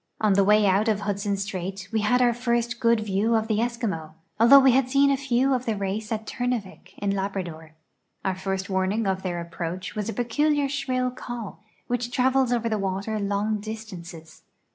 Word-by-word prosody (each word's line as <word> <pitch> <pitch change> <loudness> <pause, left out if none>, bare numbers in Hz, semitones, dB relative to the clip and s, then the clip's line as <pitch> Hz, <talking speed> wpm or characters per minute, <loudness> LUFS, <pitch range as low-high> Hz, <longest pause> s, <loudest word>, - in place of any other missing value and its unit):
On 215 -2 +3
the 200 +1 +4
way 210 +1 +4
out 200 +3 +3
of 210 -2 +1
Hudson 200 0 -1
strait 195 0 -5
we 220 - +1
had 250 +4 +3
our 240 -1 +4
lirst 235 0 -1
good 230 -3 +3
view 215 +2 +1
of 220 0 +1
tlie 215 -1 +1
Eskimo, 225 -10 -2 0.2
although 235 +5 +8
we 270 -1 +7
had 255 0 +2
seen 280 +1 +4
a - - +3
few 265 0 +1
of 255 -1 -2
the 225 - +1
race 200 +2 -3
at 220 -1 -2
Turn 245 +2 -2
avik, 195 -3 -16
in 200 -1 -1
Lal)rador. 185 -5 -4 0.5
Our 190 - +1
first 190 0 -3
warning 190 +3 0
of 190 -1 0
their 175 -2 -3
approacli 170 +2 -5
was 210 0 -3
a - - -3
peculiar 290 +4 +1
slirill 255 -3 -1
call, 240 -5 -7 0.3
wliidi 245 -1 -1
tiavels 260 0 +2
over 235 -1 +1
the 215 -2 -1
water 195 +3 -2
long 205 +1 -1
distances. 185 -7 -9
215 Hz, 195 wpm, -25 LUFS, 195-240 Hz, 0.5 s, although